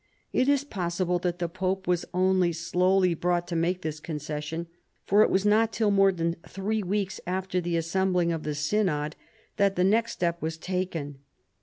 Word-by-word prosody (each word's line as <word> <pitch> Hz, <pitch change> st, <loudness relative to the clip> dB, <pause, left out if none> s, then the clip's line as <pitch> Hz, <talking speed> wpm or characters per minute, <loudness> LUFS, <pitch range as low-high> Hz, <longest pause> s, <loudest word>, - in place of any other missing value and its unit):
It 255 Hz, +2 st, +2 dB
is 285 Hz, -1 st, +3 dB
possible 180 Hz, -6 st, -1 dB
that 175 Hz, 0 st, -1 dB
the 175 Hz, -1 st, -1 dB
pope 185 Hz, +2 st, -2 dB
was 175 Hz, -1 st, +1 dB
only 185 Hz, -1 st, +2 dB
slowly 180 Hz, +2 st, +2 dB
brought 175 Hz, +1 st, 0 dB
to 170 Hz, -, -2 dB
make 175 Hz, +3 st, 0 dB
this 155 Hz, -1 st, -3 dB
con 155 Hz, 0 st, -5 dB
cession, 150 Hz, +2 st, -4 dB, 0.4 s
for 205 Hz, +2 st, +4 dB
it -, -, +5 dB
was 195 Hz, +1 st, +1 dB
not 220 Hz, +2 st, +4 dB
till 215 Hz, -2 st, +1 dB
more 195 Hz, -1 st, +5 dB
than 170 Hz, -2 st, -2 dB
three 210 Hz, +3 st, -2 dB
weeks 195 Hz, 0 st, -2 dB
after 185 Hz, 0 st, -1 dB
the 170 Hz, -1 st, -1 dB
assembling 180 Hz, +1 st, +1 dB
of 165 Hz, -1 st, -2 dB
the 150 Hz, -1 st, -3 dB
synod 150 Hz, -1 st, 0 dB, 0.4 s
that 200 Hz, -1 st, +3 dB
the 180 Hz, -, +2 dB
next 225 Hz, +4 st, +2 dB
step 170 Hz, -1 st, -1 dB
was 160 Hz, 0 st, -3 dB
taken. 165 Hz, -6 st, -3 dB
180 Hz, 185 wpm, -27 LUFS, 165-195 Hz, 0.4 s, it